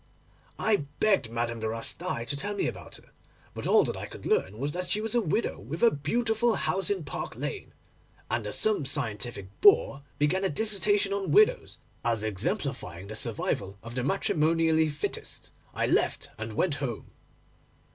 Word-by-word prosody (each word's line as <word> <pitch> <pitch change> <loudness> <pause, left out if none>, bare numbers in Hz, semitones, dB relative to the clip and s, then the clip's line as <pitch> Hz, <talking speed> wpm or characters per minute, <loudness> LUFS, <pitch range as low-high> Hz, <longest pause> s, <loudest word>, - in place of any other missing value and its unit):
I 220 -2 +3 0.2
begged 195 - +3
Madame 115 0 -2
de 110 - -2
Rastail 115 +4 -3
to 140 - -3
tell 205 +8 -3
me 200 - 0
about - - -5
her; - - -14 0.4
but - - -5
all - - +6
that - - -2
I - - -6
could - - -11
learn 100 +3 +1
was 140 +4 -2
that 180 +3 -3
she 210 - +1
was 220 +1 -2
a 240 - +3
widow 205 +4 -1
with 145 - -5
a 230 - +7
beautiful 225 - +1
house 190 +1 0
in 195 -4 -1
Park 145 - -5
Lane, - - -5 0.6
and 115 -3 -2
as 105 - -1
some 215 -7 +3
scientific 120 -7 -1
bore 145 -8 +5 0.2
began 155 +7 +1
a 190 - +2
dissertation 205 +1 +2
on 200 -1 -2
widows, 430 +4 +4 0.3
as 115 -2 +1
exemplifying 95 -2 -2
the 110 - -6
survival 105 -4 -2
of 115 +1 -8
the 125 0 -2
matrimonially 160 -1 +2
fittest, 150 0 -5 0.2
I - - -1
left - - +1
and 110 0 -6
went 165 +8 +1
home. 120 -6 -4
150 Hz, 175 wpm, -28 LUFS, -, 0.6 s, a